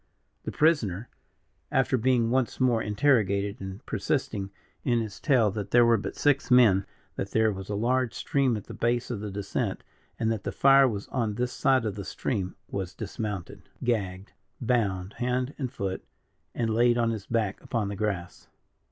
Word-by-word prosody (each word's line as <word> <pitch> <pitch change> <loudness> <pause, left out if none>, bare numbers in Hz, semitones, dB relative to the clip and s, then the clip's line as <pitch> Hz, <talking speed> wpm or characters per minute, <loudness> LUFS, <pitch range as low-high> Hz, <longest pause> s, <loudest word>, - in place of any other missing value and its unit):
The - - -3
prisoner 120 - +1 0.6
after 130 -1 +2
being 120 -1 +2
once 130 -1 0
more 125 -3 +3
interrogated, 105 -2 +1
and 95 +1 -7
persisting 100 -2 -2 0.3
in 120 -2 +2
his 110 -3 -5
tale 125 -9 +3
that 105 -1 -5
there 120 +2 +6
were 115 -1 +5
but - - -5
six 145 -2 +2
men; 115 -7 +5 0.3
that 95 - -3
there 110 +1 +3
was 95 0 -8
a 105 - -1
large 125 +3 +1
stream 135 -5 +1
at 105 - -7
the - - -10
base 120 +1 0
of 115 - -3
the 105 0 -5
descent; 100 0 -3 0.3
and 115 -1 0
that 110 -3 -3
the - - -3
fire 135 0 +6
was 105 -4 -4
on 115 -5 -1
this 125 +2 -2
side 130 -4 +2
of 105 - -1
the 100 0 -6
stream 95 -2 -3
was 95 -1 -4
dismounted, 105 -3 -6
gagged, 100 -5 -2 0.3
bound 105 -6 0
hand 125 +2 -1
and 130 -4 -2
foot, 95 -8 -4 0.5
and 115 -2 0
laid 120 +1 +4
on 115 -1 +2
his 105 -3 -5
back 110 -4 -1
upon 110 -4 -2
the 100 - -4
grass. 100 -4 -3
110 Hz, 180 wpm, -27 LUFS, 100-125 Hz, 0.6 s, there